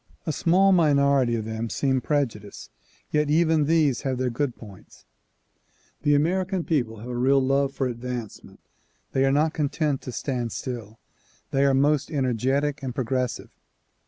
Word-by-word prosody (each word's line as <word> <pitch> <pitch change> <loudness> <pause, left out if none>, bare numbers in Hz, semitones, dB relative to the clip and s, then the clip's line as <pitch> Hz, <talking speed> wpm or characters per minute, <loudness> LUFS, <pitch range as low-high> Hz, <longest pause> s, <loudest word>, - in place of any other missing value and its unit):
A 160 - -1
small 185 +5 +3
minority 140 -7 +3
of 110 -2 -3
them 110 +1 -4
seem 130 0 0
prejudiced, 120 -8 -3 0.4
yet 150 -1 +1
even 160 -1 +3
these 155 -4 +2
have 130 -2 -2
their 125 -1 -1
good 125 +1 -2
points. 100 -5 -15 1.0
The 145 0 +3
American 180 +4 0
people 120 - -1
have 120 - -8
a 125 - -4
real 135 +3 +3
love 135 +1 +1
for 135 - -1
advancement. 120 -2 -6 0.5
They 135 0 +2
are 135 - +3
not 155 +3 +2
content 150 -1 -1
to 125 - -7
stand 120 -3 -3
still. 115 -4 -6 0.5
They 135 +1 +2
are 135 -1 +3
most 145 +1 +2
energetic 135 +1 0
and 130 -3 -5
progressive. 125 -1 -2
135 Hz, 155 wpm, -25 LUFS, 125-150 Hz, 1.0 s, small